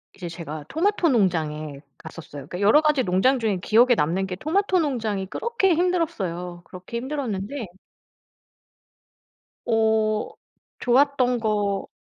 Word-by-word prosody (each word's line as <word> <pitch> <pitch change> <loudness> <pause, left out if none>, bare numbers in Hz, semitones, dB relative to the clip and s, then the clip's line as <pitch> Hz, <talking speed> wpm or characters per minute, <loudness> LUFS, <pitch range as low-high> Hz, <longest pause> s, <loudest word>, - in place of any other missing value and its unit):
이제 175 -3 -7
제가 155 -3 -7
토마토 355 0 +1
농장에 155 - 0 0.2
갔었어요. 155 -3 -10
그러니까 180 +4 -6
여러 220 +10 +6
가지 300 -4 +2
농장 200 +9 +2
중에 215 -4 0
기억에 240 +5 +4
남는 185 +3 0
게 180 - -4
토마토 370 - +1
농장이 225 - -1
그렇게 395 - 0
힘들었어요. 210 - -1
그렇게 185 +6 -8
힘들었는데 250 -3 -4 2.0
어 220 -1 +1 0.5
좋았던 255 -1 +2
거 205 -3 -1
220 Hz, 295 characters per minute, -24 LUFS, 180-280 Hz, 2.0 s, 여러